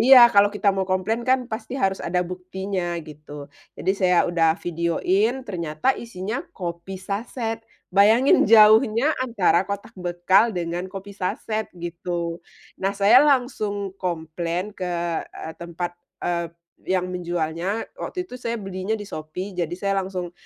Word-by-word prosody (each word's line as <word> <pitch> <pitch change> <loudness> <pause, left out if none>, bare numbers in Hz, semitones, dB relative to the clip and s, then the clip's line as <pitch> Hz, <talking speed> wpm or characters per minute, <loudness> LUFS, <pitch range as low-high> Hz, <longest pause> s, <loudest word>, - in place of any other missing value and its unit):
iya, 265 +3 +8 0.2
kalau 205 0 +6
kita 205 0 0
mau 190 -1 -2
komplain 185 +5 0
kan 260 -1 +3
pasti 220 +3 -4
harus 195 -6 0
ada 180 +1 0
buktinya 185 0 -4
gitu. 145 -2 -11 0.2
Jadi 185 - 0
saya 185 -3 +3
udah 165 -2 +2
videoin, 185 +9 0
ternyata 170 +4 -1
isinya 220 +2 -5 0.2
kopi 175 +1 -5
sachet. 225 +4 -4 0.3
Bayangin 215 +5 +5
jauhnya 220 +5 +6
antara 210 -8 +2
kotak 200 +3 -5
bekal 185 +4 +2
dengan 175 +2 -3
kopi 195 +1 -8
sachet 215 +3 -3
gitu. 170 0 -4 0.4
Nah, 195 - +1
saya 205 +6 +7
langsung 215 -8 +1
komplain 170 +2 -3
ke, 180 -3 -4 0.4
eee, 160 - -8
tempat, 175 +1 -4 0.3
eee, 170 -1 -1 0.4
yang 185 -1 +1
menjualnya. 175 +3 -2
Waktu 365 -1 -4
itu 250 - -11
saya 235 -1 -2
belinya 195 +1 -3
di 205 - -6
Shopee, 180 +4 -6
jadi 175 -2 -2
saya 200 +1 0
langsung 180 -2 -5
190 Hz, 140 wpm, -23 LUFS, 175-215 Hz, 0.4 s, iya